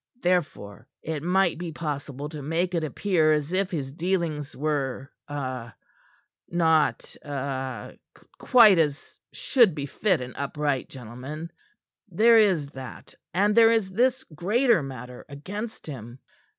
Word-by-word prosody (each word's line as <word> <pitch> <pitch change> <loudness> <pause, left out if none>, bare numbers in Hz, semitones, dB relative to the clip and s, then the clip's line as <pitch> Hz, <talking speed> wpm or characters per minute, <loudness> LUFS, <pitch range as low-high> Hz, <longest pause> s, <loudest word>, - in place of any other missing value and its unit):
Therefore, 130 - -1 0.2
it 155 -2 -3
might 180 0 +2
be 175 -2 -4
possible 145 -3 -5
to 150 -2 -7
make 165 +5 -1
it 170 -2 0
appear 155 +1 +2
as 150 +2 -1
if 190 0 +1
his 140 -6 -4
dealings 160 -3 -2
were 135 -3 -2 0.2
ah 130 -5 -5 0.7
not 160 -7 +1
ah 135 -5 -4 0.5
quite 220 -7 +7
such - - +7
as 145 +1 -7
should 235 - +3
befit 155 +5 0
an 125 0 -7
upright 140 -1 -2
gentleman. 135 +6 -8 0.6
There 225 +6 +5
is 185 -9 +3
that, 130 -2 -10 0.2
and 205 +5 +2
there 225 0 +7
is 220 -4 +1
this 250 +5 +1
greater 210 - +2
matter 125 -2 -8
against 205 +11 -7
him. 120 -5 -8
155 Hz, 130 wpm, -26 LUFS, 135-185 Hz, 0.7 s, quite